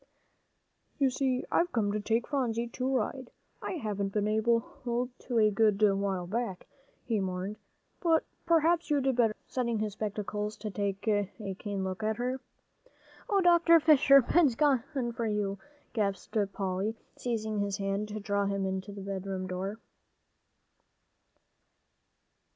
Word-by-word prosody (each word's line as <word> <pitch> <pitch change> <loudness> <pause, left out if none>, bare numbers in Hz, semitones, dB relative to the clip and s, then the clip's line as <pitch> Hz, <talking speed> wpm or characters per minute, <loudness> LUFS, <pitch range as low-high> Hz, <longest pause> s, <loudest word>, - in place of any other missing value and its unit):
"You 275 -2 +3
see, 260 -1 0
I've 350 +1 +2
come 210 -4 +1
to 210 - -1
take 225 +3 0
Phronsie 240 -4 0
to 255 +2 -2
ride. 260 0 -1 0.3
I - - -3
haven't 210 - -2
been 210 0 0
able 225 +2 +3 0.2
to 245 0 -2
a 215 -1 +5
good 210 -1 +3
while 195 -3 +2
back," 205 0 -3 0.4
he 225 -3 0
mourned, 190 +2 -3 0.4
"but 325 -2 +3 0.2
perhaps 335 +1 +3
you'd 290 -2 +2
better 230 -3 +3
go," - - -39
setting 235 -3 -1
his 215 -1 -2
spectacles 210 0 -3
to 215 - -5
take 200 +2 -3
a 205 -2 +1 0.3
keen 200 -2 -3
look 190 +1 -4
at 215 0 0
her. 250 +2 -2 0.9
"Oh, 400 -2 +3
Dr. 340 -1 +6
Fisher! 280 -3 +6
Ben's 295 -3 +3
gone 280 -2 +3 0.3
for 230 -1 -2
you," 205 -2 -1 0.3
gasped 200 -3 -2 0.2
Polly, 195 +3 -2 0.2
seizing 220 -3 -2
his 200 -1 -1
hand, 200 +1 -1
to 215 0 -5
draw 200 -1 0
him 190 -1 -1
to 200 +2 -10
the 200 0 -8
bedroom 195 -1 -4
door. 185 +3 -4
215 Hz, 145 wpm, -30 LUFS, 200-250 Hz, 0.9 s, Dr